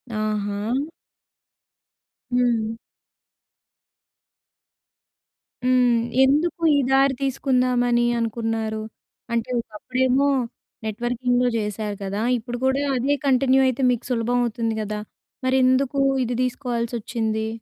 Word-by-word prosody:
ఆహా! 215 Hz, +5 st, -1 dB, 1.5 s
హ్మ్. 230 Hz, -2 st, +1 dB, 2.9 s
హ్మ్. 250 Hz, -2 st, +4 dB, 0.2 s
ఎందుకు 305 Hz, +5 st, +2 dB
ఈ -, -, +3 dB
దారి 270 Hz, 0 st, +4 dB
తీసుకుందామని 250 Hz, -2 st, +1 dB, 0.2 s
అనుకున్నారు? 225 Hz, -1 st, -2 dB, 0.5 s
అంటే 230 Hz, +1 st, -1 dB
ఒకప్పుడేమో 255 Hz, +5 st, 0 dB, 0.6 s
నెట్వర్కింగ్‌లో 245 Hz, +3 st, 0 dB
చేశారు 210 Hz, -1 st, -3 dB
కదా! 200 Hz, +2 st, -3 dB, 0.2 s
ఇప్పుడు 240 Hz, +1 st, -6 dB
కూడా 265 Hz, +2 st, +2 dB
అదే 270 Hz, +4 st, +1 dB
కంటిన్యూ 265 Hz, 0 st, +4 dB
అయితే 255 Hz, +1 st, -1 dB
మీకు 240 Hz, -, -2 dB
సులభమవుతుంది 235 Hz, -1 st, 0 dB
గదా? 210 Hz, 0 st, -4 dB, 0.5 s
మరెందుకు 260 Hz, +1 st, +2 dB, 0.2 s
ఇది 240 Hz, 0 st, -2 dB
తీసుకోవాల్సొచ్చింది? 235 Hz, -3 st, -2 dB
245 Hz, 80 wpm, -23 LUFS, 220-255 Hz, 2.9 s, హ్మ్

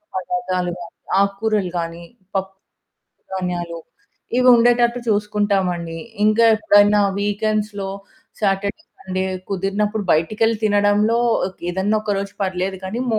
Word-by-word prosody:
పదార్దాలు 185 Hz, -3 st, -2 dB
గాని, 170 Hz, -1 st, -10 dB, 0.3 s
ఆకూరలు 200 Hz, -1 st, 0 dB
గాని, 170 Hz, 0 st, -4 dB, 0.3 s
పప్పు 190 Hz, 0 st, -3 dB, 0.8 s
ధాన్యాలు. 175 Hz, -2 st, -3 dB, 0.6 s
ఇవి 255 Hz, 0 st, +4 dB
ఉండేటట్టు 240 Hz, +1 st, +3 dB
చూసుకుంటామండి. 200 Hz, -5 st, 0 dB, 0.3 s
ఇంకా 215 Hz, +2 st, +4 dB
ఎప్పుడైనా 205 Hz, -1 st, +4 dB, 0.2 s
వీక్‌ఎండ్స్‌లో 205 Hz, -1 st, -1 dB, 0.5 s
సాటర్డే, 200 Hz, -1 st, -1 dB, 0.2 s
సండే 185 Hz, 0 st, -2 dB, 0.3 s
కుదిరినప్పుడు, 205 Hz, +2 st, -1 dB
బయటికెళ్ళి 215 Hz, +8 st, +1 dB
తినడంలో 205 Hz, +2 st, +3 dB, 0.5 s
ఏదన్నా 190 Hz, +4 st, 0 dB
ఒక 215 Hz, -, -3 dB
రోజు 200 Hz, 0 st, -5 dB
పర్లేదు 190 Hz, 0 st, -2 dB
కానీ, 205 Hz, +6 st, -3 dB
మో 220 Hz, -, +2 dB
205 Hz, 105 wpm, -20 LUFS, 185-215 Hz, 0.8 s, ఇవి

